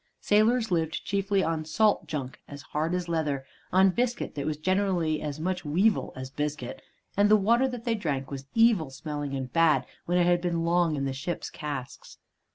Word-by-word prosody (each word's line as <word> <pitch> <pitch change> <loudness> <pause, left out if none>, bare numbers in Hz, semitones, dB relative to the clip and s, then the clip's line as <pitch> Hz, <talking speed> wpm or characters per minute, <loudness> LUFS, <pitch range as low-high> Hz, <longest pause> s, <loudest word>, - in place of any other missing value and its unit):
Sailors 220 +2 +3
lived 160 -2 -1
chiefly 200 0 +1
on 160 -1 -1
salt 210 +7 +2
junk, 135 -5 -5
as 140 -1 -9
hard 160 +4 -1
as 180 -1 -3
leather, 150 -5 -1 0.3
on 190 +1 +5
biscuit 240 +4 -1
that 140 -1 -4
was 155 -1 -1
generally 180 -2 0
as 150 0 -4
much 180 +3 -2
weevil 185 +8 +2
as 130 0 -7
biscuit, 145 -3 -4 0.3
and 205 +1 +4
the 215 - +7
water 235 +6 +3
that 245 -3 -6
they 235 - +1
drank 145 -11 -2
was 135 0 -6
evil 225 - +4
smelling 145 +1 -5
and 130 -2 -5
bad 165 -2 +4 0.2
when 175 +1 +2
it 175 - +4
had 175 0 +3
been 170 -2 -1
long 170 -2 +2
in 140 -1 -2
the 135 - -2
ship's 140 +6 -4
casks. 145 -4 -7
165 Hz, 190 wpm, -27 LUFS, 145-195 Hz, 0.3 s, the